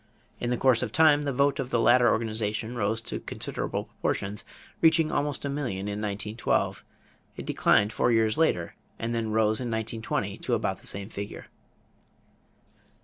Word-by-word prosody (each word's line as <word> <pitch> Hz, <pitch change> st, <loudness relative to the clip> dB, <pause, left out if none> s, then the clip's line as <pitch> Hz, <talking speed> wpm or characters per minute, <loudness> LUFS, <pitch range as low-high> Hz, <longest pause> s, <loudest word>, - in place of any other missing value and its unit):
In 120 Hz, -, -2 dB
the 125 Hz, -, +1 dB
course 130 Hz, -2 st, +4 dB
of 125 Hz, -4 st, -2 dB
time 150 Hz, 0 st, +5 dB
the 140 Hz, -, 0 dB
vote 140 Hz, +1 st, +2 dB
of 130 Hz, -2 st, -2 dB
the 120 Hz, -, +1 dB
latter 120 Hz, +1 st, +5 dB
organization 110 Hz, +1 st, -1 dB
rose 110 Hz, 0 st, 0 dB
to -, -, -5 dB
considerable -, -, -4 dB
proportions, 100 Hz, +1 st, -3 dB, 0.4 s
reaching 160 Hz, -1 st, +4 dB
almost 145 Hz, -1 st, -1 dB
a -, -, 0 dB
million 135 Hz, -9 st, -3 dB
in 105 Hz, +1 st, -3 dB
1912. 105 Hz, +2 st, -1 dB, 0.5 s
It -, -, -6 dB
declined 105 Hz, +2 st, +3 dB
four -, -, +2 dB
years 110 Hz, -1 st, +3 dB
later 90 Hz, -, +1 dB, 0.2 s
and 115 Hz, +1 st, -3 dB
then 115 Hz, -1 st, -1 dB
rose 110 Hz, +1 st, +2 dB
in 125 Hz, -, -3 dB
1920 110 Hz, 0 st, -3 dB
to -, -, 0 dB
about -, -, -2 dB
the -, -, -7 dB
same 100 Hz, +1 st, -4 dB
figure. 100 Hz, -2 st, -7 dB
115 Hz, 165 wpm, -27 LUFS, 105-130 Hz, 0.5 s, time